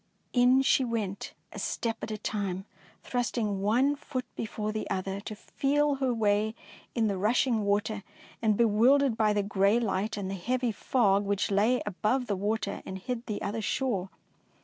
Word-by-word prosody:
In 250 Hz, +1 st, +5 dB
she 270 Hz, -, +4 dB
went, 220 Hz, -5 st, -3 dB, 0.2 s
a -, -, -6 dB
step 230 Hz, -1 st, -2 dB
at -, -, -4 dB
a 215 Hz, -, -3 dB
time, 195 Hz, -3 st, -3 dB, 0.4 s
thrust 245 Hz, 0 st, -2 dB
ing 205 Hz, -4 st, 0 dB
one 250 Hz, +8 st, +3 dB
foot 270 Hz, -3 st, -5 dB
before 215 Hz, -1 st, -3 dB
the 215 Hz, 0 st, -4 dB
other 190 Hz, +1 st, -2 dB
to 215 Hz, +1 st, -7 dB
feel 285 Hz, +5 st, 0 dB
her 265 Hz, -2 st, +1 dB
way 215 Hz, -1 st, +1 dB, 0.4 s
in 230 Hz, -2 st, +2 dB
the 200 Hz, -3 st, 0 dB
rushing 230 Hz, +2 st, +2 dB
water, 205 Hz, +1 st, 0 dB, 0.4 s
and 215 Hz, -3 st, +2 dB
be 235 Hz, -, +5 dB
wildered 245 Hz, +4 st, +4 dB
by 215 Hz, -1 st, +3 dB
the 205 Hz, -1 st, +1 dB
grey 200 Hz, +2 st, +3 dB
light 210 Hz, -1 st, -1 dB
and 200 Hz, -2 st, -3 dB
the 195 Hz, -, -3 dB
heavy 245 Hz, +6 st, -1 dB
fog 205 Hz, -2 st, +2 dB
which 200 Hz, 0 st, 0 dB
lay 215 Hz, +6 st, +3 dB
above 215 Hz, +6 st, 0 dB
the 205 Hz, -, -1 dB
water 205 Hz, +1 st, -2 dB
and 190 Hz, -, -6 dB
hid 240 Hz, +4 st, -5 dB
the 210 Hz, -3 st, -3 dB
other 220 Hz, +2 st, -2 dB
shore. 210 Hz, -4 st, -1 dB
215 Hz, 180 wpm, -29 LUFS, 200-245 Hz, 0.4 s, In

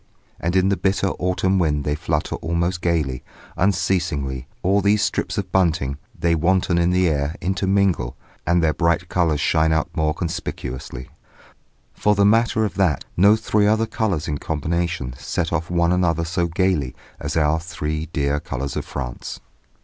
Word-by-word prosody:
And 85 Hz, +2 st, -1 dB
in 95 Hz, +1 st, +4 dB
the 100 Hz, -, +1 dB
bitter 95 Hz, 0 st, +1 dB
autumn 95 Hz, +1 st, +1 dB
wind 75 Hz, -4 st, +1 dB
they 75 Hz, -, 0 dB
flutter 75 Hz, -1 st, -2 dB
almost 85 Hz, +2 st, -1 dB
gaily, 75 Hz, -7 st, 0 dB, 0.3 s
unceasingly, 80 Hz, -9 st, 0 dB, 0.2 s
all 100 Hz, +3 st, +3 dB
these 105 Hz, +1 st, +3 dB
strips -, -, -1 dB
of 95 Hz, -3 st, -3 dB
bunting, 80 Hz, -7 st, +1 dB, 0.2 s
they 85 Hz, 0 st, +2 dB
wanton 85 Hz, +1 st, +2 dB
in 85 Hz, 0 st, +3 dB
the 90 Hz, 0 st, +3 dB
air, 75 Hz, 0 st, 0 dB
intermingle, 95 Hz, -7 st, +1 dB, 0.3 s
and 85 Hz, 0 st, +3 dB
their 80 Hz, -1 st, +3 dB
bright 85 Hz, +2 st, +1 dB
colours 80 Hz, -4 st, +1 dB
shine 80 Hz, +3 st, +2 dB
out 80 Hz, -1 st, 0 dB
more 80 Hz, -2 st, +1 dB
conspicuously. 65 Hz, -6 st, -5 dB, 0.8 s
For 105 Hz, 0 st, +2 dB
the 100 Hz, 0 st, +4 dB
matter 110 Hz, +1 st, +3 dB
of 105 Hz, -, -3 dB
that, 90 Hz, -6 st, +1 dB
no 100 Hz, +4 st, +6 dB
three 105 Hz, -1 st, +1 dB
other 110 Hz, +1 st, +3 dB
colours 100 Hz, -7 st, -1 dB
in 75 Hz, -3 st, -2 dB
combination 80 Hz, -3 st, -2 dB
set 85 Hz, -1 st, -2 dB
off 85 Hz, 0 st, -1 dB
one 85 Hz, -1 st, +2 dB
another 85 Hz, -2 st, +1 dB
so 85 Hz, +1 st, 0 dB
gaily 85 Hz, -6 st, 0 dB, 0.2 s
as -, -, -3 dB
our 80 Hz, 0 st, +2 dB
three 80 Hz, -2 st, -4 dB
dear 70 Hz, -2 st, 0 dB
colours 70 Hz, -1 st, -4 dB
of -, -, -3 dB
France. -, -, -6 dB
85 Hz, 165 wpm, -22 LUFS, 75-95 Hz, 0.8 s, no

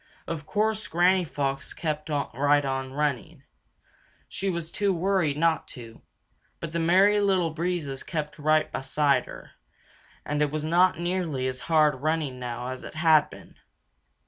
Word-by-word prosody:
Of 155 Hz, -3 st, -5 dB
course, 215 Hz, +1 st, 0 dB
Granny 180 Hz, +2 st, +3 dB
Fox 140 Hz, -4 st, -3 dB
kept 155 Hz, -1 st, -4 dB
right 145 Hz, 0 st, +1 dB
on 135 Hz, -1 st, -3 dB
running. 140 Hz, -3 st, -2 dB, 0.8 s
She 195 Hz, -, -3 dB
was 170 Hz, -2 st, -4 dB
too 205 Hz, -1 st, 0 dB
worried 180 Hz, -4 st, +1 dB
not 165 Hz, +1 st, +1 dB
to. 115 Hz, -2 st, -11 dB, 0.6 s
But 165 Hz, -1 st, -6 dB
the 170 Hz, -, 0 dB
Merry 190 Hz, +5 st, +4 dB
Little 185 Hz, -5 st, +2 dB
Breezes 160 Hz, -4 st, -3 dB
kept 150 Hz, -2 st, -5 dB
right 155 Hz, +1 st, +2 dB
beside 140 Hz, +1 st, +1 dB
her, -, -, -11 dB, 0.7 s
and 150 Hz, 0 st, -1 dB
it 150 Hz, -, +2 dB
was 155 Hz, +1 st, -3 dB
not 175 Hz, +2 st, +3 dB
nearly 175 Hz, -7 st, -1 dB
as 130 Hz, -1 st, -3 dB
hard 155 Hz, -2 st, +4 dB
running 155 Hz, -4 st, -1 dB
now 125 Hz, 0 st, -5 dB
as 130 Hz, 0 st, -6 dB
it -, -, -9 dB
had 160 Hz, -2 st, +4 dB
been. -, -, -14 dB
155 Hz, 150 wpm, -26 LUFS, 140-175 Hz, 0.8 s, Merry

